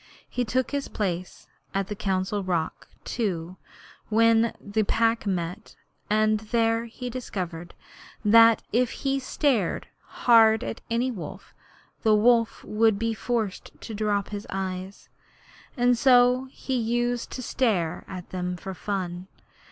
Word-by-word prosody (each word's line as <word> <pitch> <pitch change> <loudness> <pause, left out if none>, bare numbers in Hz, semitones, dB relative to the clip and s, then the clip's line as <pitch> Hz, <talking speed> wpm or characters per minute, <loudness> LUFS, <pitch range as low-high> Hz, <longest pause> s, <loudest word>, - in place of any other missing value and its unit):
He 250 - -2
took 255 +3 -1
his 280 -1 -2
place 185 -3 -4 0.3
at 195 0 +1
the 210 - -4
Council 195 +1 -1
Rock, 170 -4 -2 0.2
too, 185 -6 -3 0.5
when 230 +1 +4
the 205 +2 -1
Pack 225 +1 +1
met, 180 +2 -3 0.3
and 215 0 +3
there 225 +1 +1
he 235 +2 -7
discovered 180 -9 -5 0.5
that 230 +1 +7
if 245 +1 +3 0.2
he 275 0 +2
stared 255 - 0 0.4
hard 225 -2 +6
at - - -5
any 240 +3 0
wolf, 175 -10 -8 0.5
the 220 -1 +4
wolf 230 +1 +3
would 220 -1 +2
be 230 +1 -1
forced 220 -3 -3
to 225 - -7
drop 205 -1 -1
his 205 0 -6
eyes, 190 0 -5 0.7
and 245 0 +4
so 250 +1 +5
he 265 - -5
used 240 0 0
to 255 - -5
stare 205 -11 0 0.5
for 190 +1 -6
fun. 185 -2 -4
220 Hz, 130 wpm, -26 LUFS, 195-240 Hz, 0.7 s, that